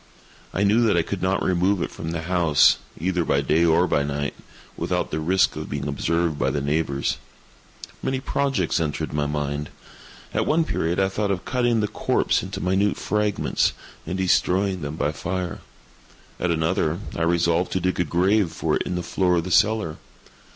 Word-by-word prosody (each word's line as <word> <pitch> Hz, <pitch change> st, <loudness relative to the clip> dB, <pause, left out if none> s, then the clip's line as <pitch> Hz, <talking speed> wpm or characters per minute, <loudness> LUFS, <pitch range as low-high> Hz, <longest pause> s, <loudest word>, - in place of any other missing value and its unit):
I 100 Hz, -, 0 dB
knew 105 Hz, +4 st, +4 dB
that 100 Hz, -, +3 dB
I 85 Hz, -, +3 dB
could 100 Hz, +2 st, -4 dB
not 95 Hz, +1 st, +1 dB
remove 95 Hz, +2 st, +2 dB
it -, -, -4 dB
from 80 Hz, -, -6 dB
the 85 Hz, 0 st, -3 dB
house, 85 Hz, -4 st, +4 dB, 0.2 s
either 90 Hz, +1 st, 0 dB
by -, -, +1 dB
day 80 Hz, +2 st, +2 dB
or 85 Hz, +1 st, +4 dB
by 80 Hz, -, +1 dB
night, 70 Hz, 0 st, -2 dB, 0.4 s
without -, -, -2 dB
the 80 Hz, -, -1 dB
risk 95 Hz, +4 st, +2 dB
of -, -, -6 dB
being -, -, -3 dB
observed 85 Hz, +2 st, 0 dB
by -, -, +2 dB
the 75 Hz, -, -1 dB
neighbors. 70 Hz, -1 st, -1 dB, 0.8 s
Many 130 Hz, 0 st, -1 dB
projects 135 Hz, -, 0 dB
entered 75 Hz, -3 st, -2 dB
my 75 Hz, -1 st, 0 dB
mind. 75 Hz, 0 st, -3 dB, 0.6 s
At -, -, 0 dB
one 165 Hz, +2 st, +3 dB
period 85 Hz, -, -1 dB
I 95 Hz, -, +3 dB
thought 100 Hz, +2 st, -2 dB
of 95 Hz, -2 st, -2 dB
cutting 120 Hz, -3 st, +1 dB
the 105 Hz, -, +1 dB
corpse -, -, +1 dB
into -, -, -6 dB
minute 95 Hz, +3 st, +1 dB
fragments, 105 Hz, -1 st, 0 dB, 0.3 s
and 90 Hz, +3 st, -2 dB
destroying 95 Hz, 0 st, +1 dB
them 75 Hz, +1 st, -4 dB
by 75 Hz, -1 st, 0 dB
fire. 90 Hz, +3 st, -4 dB, 0.8 s
At 90 Hz, -, 0 dB
another, 80 Hz, 0 st, +1 dB, 0.2 s
I -, -, -3 dB
resolved 85 Hz, +1 st, +2 dB
to 95 Hz, -, +1 dB
dig 95 Hz, 0 st, -1 dB
a -, -, +4 dB
grave 90 Hz, +3 st, +2 dB
for -, -, -1 dB
it -, -, -4 dB
in 90 Hz, -, -2 dB
the 90 Hz, -, -2 dB
floor 90 Hz, 0 st, +1 dB
of 85 Hz, -, +1 dB
the 90 Hz, -, -5 dB
cellar. 105 Hz, -5 st, +2 dB
90 Hz, 185 wpm, -23 LUFS, 80-95 Hz, 0.8 s, knew